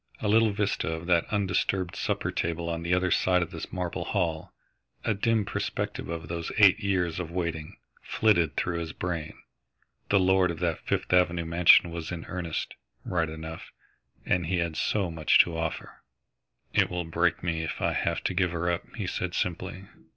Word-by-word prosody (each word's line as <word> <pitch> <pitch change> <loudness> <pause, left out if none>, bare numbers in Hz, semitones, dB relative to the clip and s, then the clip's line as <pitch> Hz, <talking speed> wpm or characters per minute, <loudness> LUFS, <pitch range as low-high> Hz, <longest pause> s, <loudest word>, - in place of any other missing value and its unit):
A 110 - -2
little 110 +1 +4
vista 100 -4 -1
of 80 +1 -5
that 85 -2 +3
undisturbed 95 -2 0
supper - - -1
table 85 0 -2
on 85 0 -2
the 85 +1 -3
other 90 0 +2
side 90 -1 +3
of 85 - -8
the - - -7
marble 90 -2 -3
hall, 80 -2 -1 0.5
a 110 - +2
dim 110 +1 +1
perspective - - -3
of 80 -2 -5
those 85 0 -4
eight 100 -1 +7
years 90 -5 0
of 85 -3 -4
waiting, 85 -3 -4 0.2
flitted 85 -8 +2
through 85 -1 -1
his 80 -2 -5
brain. 80 -4 -4 0.7
The 100 - +4
lord 95 -1 +4
of 85 - -3
that 85 -1 -1
Fifth - - -2
Avenue 85 -2 +3
Mansion 85 +1 +5
was 85 0 -5
in 85 -2 -5
earnest, 90 -4 -4 0.3
right 85 -3 0
enough, 80 +1 -8 0.6
and 90 -2 +1
he 90 +1 0
had 85 -2 -1
so 95 -1 0
much 80 -2 +3
to 85 - -6
offer. 80 -1 -4 0.7
"It - - +3
will 90 -1 -3
break 85 +1 0
me 85 -2 -1
if 80 - -4
I - - +1
have - - -1
to - - 0
give 90 0 +2
her 85 +1 0
up," 85 +2 -1
he 105 -5 -3
said 90 -1 -3
simply. 90 +2 -3
85 Hz, 185 wpm, -28 LUFS, 80-95 Hz, 0.7 s, eight